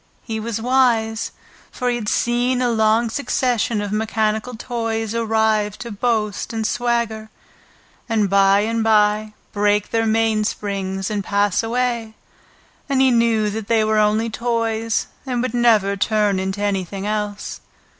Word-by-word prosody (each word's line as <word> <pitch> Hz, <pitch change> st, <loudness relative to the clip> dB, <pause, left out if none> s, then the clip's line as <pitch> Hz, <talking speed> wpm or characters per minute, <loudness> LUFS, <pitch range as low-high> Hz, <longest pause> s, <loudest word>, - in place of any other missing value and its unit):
He 220 Hz, -1 st, -4 dB
was 225 Hz, 0 st, -3 dB
wise, 230 Hz, -3 st, +1 dB, 0.4 s
for 250 Hz, -, -4 dB
he -, -, 0 dB
had 220 Hz, -3 st, -3 dB
seen 245 Hz, +1 st, +1 dB
a 245 Hz, -1 st, +1 dB
long 220 Hz, +1 st, +2 dB
succession 245 Hz, -4 st, 0 dB
of 205 Hz, -1 st, -4 dB
mechanical 220 Hz, +2 st, -1 dB
toys 225 Hz, -2 st, -3 dB
arrive 220 Hz, -2 st, +1 dB
to 235 Hz, -, -7 dB
boast 215 Hz, -1 st, -1 dB
and 225 Hz, -1 st, -2 dB
swagger, 235 Hz, -2 st, -1 dB, 0.8 s
and 220 Hz, -3 st, +2 dB
by 195 Hz, +1 st, +4 dB
and 225 Hz, +1 st, -1 dB
by 215 Hz, -1 st, +2 dB, 0.2 s
break 205 Hz, 0 st, +1 dB
their 225 Hz, -1 st, +1 dB
mainsprings 210 Hz, -3 st, -1 dB
and 205 Hz, -2 st, -2 dB
pass 200 Hz, -1 st, +1 dB
away, 235 Hz, -1 st, -2 dB, 0.7 s
and 275 Hz, -1 st, +1 dB
he 265 Hz, -1 st, +5 dB
knew 230 Hz, -3 st, +2 dB
that 215 Hz, 0 st, -5 dB
they 225 Hz, -2 st, +3 dB
were 215 Hz, 0 st, +2 dB
only 215 Hz, +2 st, +2 dB
toys, 230 Hz, -1 st, -1 dB, 0.2 s
and 250 Hz, -2 st, -1 dB
would 250 Hz, -2 st, -2 dB
never 220 Hz, -5 st, +3 dB
turn 205 Hz, -1 st, +1 dB
into 190 Hz, +2 st, -3 dB
anything 195 Hz, -1 st, -2 dB
else. 210 Hz, -1 st, -3 dB
220 Hz, 145 wpm, -20 LUFS, 210-235 Hz, 0.8 s, he